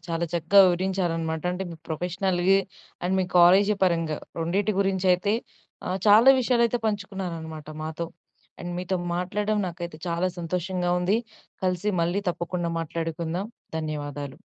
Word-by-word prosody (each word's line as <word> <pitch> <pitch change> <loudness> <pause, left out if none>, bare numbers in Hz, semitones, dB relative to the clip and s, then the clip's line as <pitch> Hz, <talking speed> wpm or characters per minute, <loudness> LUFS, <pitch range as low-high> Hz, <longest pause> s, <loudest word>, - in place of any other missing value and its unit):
చాలా 165 +1 -1
చక్కగా 170 +4 +5
వివరించారనమాట. 175 -3 -1
అంటే, 185 +1 -3
మీ 165 - -8
ప్రొఫెషనల్‌గా 180 +3 +1 0.5
అండ్ 185 +2 +1
మీ - - +1
కాలేజీ 195 +4 +6
పరంగా, 165 -3 +1 0.2
రెండిటి 195 +6 +1
గురించి 190 -1 0
అయితే 200 +3 -1 0.6
ఆహ్, 185 +1 -1
చాలా 220 +6 +8
విషయాలైతే 240 -1 +2
పంచుకున్నారనమాట 180 -7 -4 0.2
మాతో. 160 +1 -4 0.5
అండ్ 175 0 -5
మీతో 185 +1 -1 0.2
మాట్లాడడం 205 +4 -1
నాకైతే 170 -2 -7
చాలా 170 +2 0
సంతోషంగా 180 +1 -2
ఉంది. 185 +4 +2 0.5
కలిసి 185 +2 0
మళ్ళీ 175 +4 +1
తప్పకుండా 170 0 -3
మాట్లాడుకుందాం. 165 +3 -3 0.3
ధన్యవాదాలు. 145 -3 -5
180 Hz, 125 wpm, -26 LUFS, 165-195 Hz, 0.6 s, చాలా